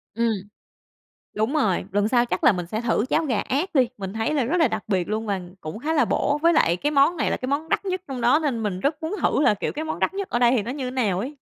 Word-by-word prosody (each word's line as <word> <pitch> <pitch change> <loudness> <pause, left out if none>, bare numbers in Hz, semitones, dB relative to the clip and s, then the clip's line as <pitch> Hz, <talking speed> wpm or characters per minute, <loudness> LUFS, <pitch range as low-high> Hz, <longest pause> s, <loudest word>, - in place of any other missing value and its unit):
Ừm. 230 0 +1 1.1
Đúng 220 +8 -1
rồi, 195 - +1
lần 205 +1 +2
sau 245 0 +3
chắc - - -2
là 235 - +7
mình 180 -2 -4
sẽ 215 +5 -3
thử 235 -1 +1
cháo 320 - +1
gà 245 -7 0
ác 315 +7 -2
đi, 255 -4 +4
mình 195 -1 -5
thấy 225 +7 -1
là 275 -5 +1
rất 315 +9 0
là 305 - +5
đặc 215 - -3
biệt 185 -4 0
luôn 215 +1 -2
và 195 -2 -1 0.2
cũng 155 +7 -6
khá 310 +6 -2
là 300 - +3
bổ. 290 +1 0
Với 335 0 +5
lại 175 - +3
cái 290 +10 -1
món 295 +4 +3
này - - 0
là - - 0
cái 255 - -5
món 300 +3 -1
đắt - - 0
nhất 370 -1 -2
trong 260 -2 -5
đó 245 +6 +4
nên 245 -7 -1
mình 190 -3 -2
rất 295 +5 -1
muốn 320 +5 -3
thử - - +2
là, 210 - +4
kiểu, - - -3
cái 310 +2 -4
món 315 - -4
đắt - - 0
nhất 395 -1 -3
ở 240 - +1
đây 240 0 +4
thì 210 - +1
nó 235 - -5
như 260 -2 -4
nào 215 -8 0
ấy. 280 +6 -6
250 Hz, 300 wpm, -24 LUFS, 215-300 Hz, 1.1 s, là